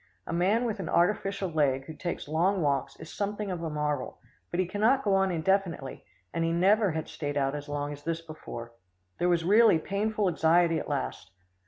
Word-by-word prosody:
A - - -4
man 195 +8 +2
with 220 -3 -2
an 185 - -4
artificial 195 +2 +1
leg 140 -5 +1
who 160 - -8
takes 175 0 -5
long 175 +4 +1
walks 140 -2 0
is 160 - -10
something 205 0 -3
of 175 -2 -4
a 165 - -3
marvel, 150 -3 -2 0.3
but 175 - -3
he 185 - +3
cannot 220 +9 +2
go 200 - +2
on 195 0 +3
indefinitely, 170 -4 -1 0.3
and 165 - 0
he 165 - +1
never 195 +2 +3
had 160 0 -3
stayed 145 -1 -4
out 135 -1 +1
as 145 0 -6
long 145 0 -3
as 145 - -10
this 165 +1 -2
before. 135 -8 -9 0.5
There 175 - +2
was 170 -1 +2
really 210 0 +6
painful 205 +4 -1
anxiety 165 0 +3
at - - -6
last. 140 -3 -3
170 Hz, 200 wpm, -28 LUFS, 150-195 Hz, 0.5 s, really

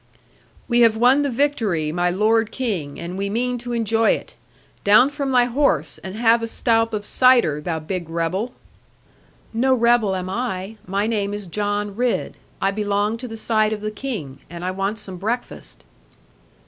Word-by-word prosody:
'We 240 -1 +2
have 230 -2 +5
won 250 +5 +5
the 285 - 0
victory, 225 - 0
my 175 +2 +1
lord 220 +4 +2
King, 190 - -3
and 175 +3 -6
we 200 0 -1
mean 245 +3 -1
to 240 +1 -6
enjoy 225 -1 +2
it. - - -7 0.5
Down 215 +7 +6
from 280 -2 -3
thy 250 -2 +4
horse, 235 - 0
and 190 +1 -7
have 230 +1 +3
a 230 - -2
stoup 225 0 +1
of 210 -2 -3
cider, 240 - +4
thou 165 +1 -2
big 165 +2 -5
rebel.' 170 +8 -2 1.0
'No 260 +3 +3
rebel 235 -4 +3
am 185 0 -4
I. 195 -1 -3
My 200 +2 0
name 205 -2 -1
is 205 -1 -6
John 205 +2 -2
Ridd. 245 +1 -1 0.2
I 195 - +1
belong 205 +1 0
to 250 +2 -7
the 225 -1 -7
side 220 -1 +1
of 210 - -5
the 215 0 -3
King: 205 - -6
and 170 +1 -7
I 185 - -1
want 195 +3 -2
some 195 -3 -6
breakfast.' 215 - -5
215 Hz, 175 wpm, -21 LUFS, 190-235 Hz, 1.0 s, Down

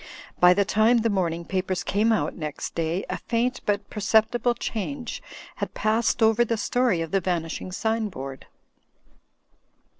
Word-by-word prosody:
By 180 0 +7
the 200 - +2
time 220 +4 +4
the 225 0 +1
morning 170 -3 -1
papers 185 -1 -2
came 215 +3 +2
out 220 - +1
next 150 -3 -5
day 165 +3 -1
a - - -4
faint 240 +2 -1
but 205 0 0
perceptible 220 +3 +2
change 240 +3 -4 0.4
had - - -4
passed 225 +2 +1
over 220 +2 +5
the 230 -1 -1
story 235 -4 +1
of 165 - -4
the 195 - +2
vanishing 170 0 -3
sign 220 +2 -1
board. 135 -5 -8
210 Hz, 150 wpm, -25 LUFS, 180-230 Hz, 0.4 s, By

